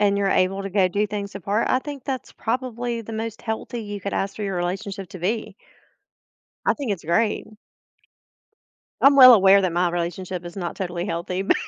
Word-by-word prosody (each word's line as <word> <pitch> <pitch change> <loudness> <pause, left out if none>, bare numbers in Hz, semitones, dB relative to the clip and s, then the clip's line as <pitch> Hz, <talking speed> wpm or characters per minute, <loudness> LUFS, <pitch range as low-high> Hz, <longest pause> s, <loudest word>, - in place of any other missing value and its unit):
and 200 -1 +3
you're 200 -1 +1
able 195 +1 +1
to 195 - -4
go 190 -1 +3
do 205 +4 0
things 205 -1 -5
apart, 200 +3 -1
I 255 - +3
think 280 -1 -8
that's 265 -2 -4
probably 240 0 -3
the 225 +1 -9
most 225 0 -4
healthy 230 +1 -4
you 205 -1 -6
could 200 - -3
ask 195 0 -2
for 215 - -5
your 195 -2 -2
relationship 190 +2 -4
to 185 - -8
be. 215 +3 -2 1.1
I - - +4
think 275 -7 -3
it's 190 -4 -4
great. 210 +7 +1 1.6
I'm 275 +1 +7
well 255 -2 +11
aware 195 -2 +6
that 180 -3 0
my 175 0 +2
relationship 175 +1 -4
is 175 - -8
not 175 -3 -4
totally 175 -2 -3
healthy, 180 -1 -3
bu 195 - +3
200 Hz, 195 wpm, -23 LUFS, 185-225 Hz, 1.6 s, well